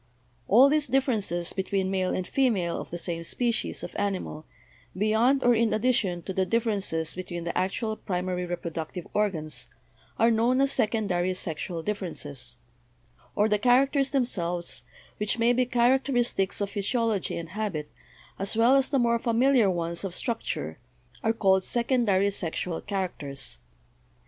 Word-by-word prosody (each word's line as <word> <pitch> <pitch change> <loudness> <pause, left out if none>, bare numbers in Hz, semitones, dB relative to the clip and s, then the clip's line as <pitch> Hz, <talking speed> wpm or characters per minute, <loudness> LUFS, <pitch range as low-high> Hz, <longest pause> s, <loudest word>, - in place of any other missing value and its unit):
All 245 +7 +7
these 295 +1 +2
differences 220 - 0
between 190 0 -1
male 185 -1 0
and 185 -1 -2
fe 270 -2 +2
male 180 -7 -1
of - - -10
the 175 - -5
same 170 -1 -4
species 235 +6 -1
of - - -7
animal, 190 -6 -3 0.5
beyond 225 +7 +3
or 245 - +5
in 230 -1 +2
addition 210 -7 +1
to 190 - -5
the 190 - +1
differences 195 -7 0
between 180 -2 -5
the 170 - -4
actual 205 +4 -1
primary 180 -2 -3
reproductive 170 0 -5
organs, 175 -8 -1 0.5
are 230 +1 +4
known 235 +3 +2
as 275 0 +4
secondary 200 -6 +1
sexual 165 -1 -4
differences, 145 - -5 0.8
or 210 - +3
the 210 -1 +1
characters 270 +4 +3
themselves, 175 - -1 0.4
which 210 +2 0
may 235 +1 +3
be 250 0 +1
characteristics 245 -5 +1
of 200 -1 -1
physiology 220 -1 0
and 165 -1 -6
habit, 185 -7 -3 0.5
as 195 +3 -1
well 235 +4 +5
as 270 -1 +3
the 280 - +1
more 235 -2 +2
familiar 240 -1 +3
ones 170 -1 -2
of 185 -3 -3
structure, 235 -2 -2 0.4
are 225 - +3
called, 190 -4 +3
secondary 230 -5 +2
sexual 170 -2 -3
characters. 145 - -4
200 Hz, 145 wpm, -27 LUFS, 175-235 Hz, 0.8 s, All